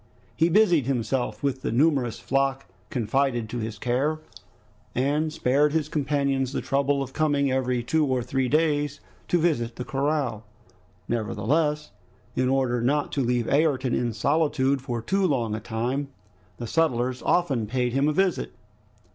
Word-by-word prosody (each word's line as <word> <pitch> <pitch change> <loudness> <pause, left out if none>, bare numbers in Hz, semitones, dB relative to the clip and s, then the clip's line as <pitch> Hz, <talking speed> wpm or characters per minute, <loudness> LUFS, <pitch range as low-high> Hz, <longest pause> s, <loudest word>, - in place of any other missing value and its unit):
He 165 - +3
busied 175 - +4
himself 125 -3 -1
with 135 -2 -1
the - - -2
numerous 135 -2 +2
flock 135 0 0 0.2
confided 120 0 0
to 120 - -4
his 110 -1 -4
care, 135 +8 0 0.8
and 145 +5 +1
spared 145 0 +2
his 155 -2 0
companions 140 -3 0
the - - -1
trouble 140 0 +1
of 135 0 -9
coming 145 -3 +1
every 125 -2 0
two 155 +4 +1
or 130 -2 0
three 130 +1 -1
days 150 -1 +1 0.3
to 175 - +2
visit 140 -9 0
the 125 - -5
corral. 140 -6 -1 0.6
Nevertheless, 145 +8 0 0.4
in 130 0 +1
order 130 -3 +1
not 145 +4 +1
to 140 - -1
leave 120 -1 0
Ayrton 135 -3 +2
in 120 -1 0
solitude 140 +2 +1
for 120 -3 -4
too 195 +6 +1
long 120 -8 0
a 110 - -2
time, 120 +6 -2 0.5
the 120 - -5
settlers 125 -3 0
often 135 -11 +1
paid 125 +1 -1
him 135 +2 +2
a - - +3
visit. 170 - 0
135 Hz, 155 wpm, -25 LUFS, 120-150 Hz, 0.8 s, busied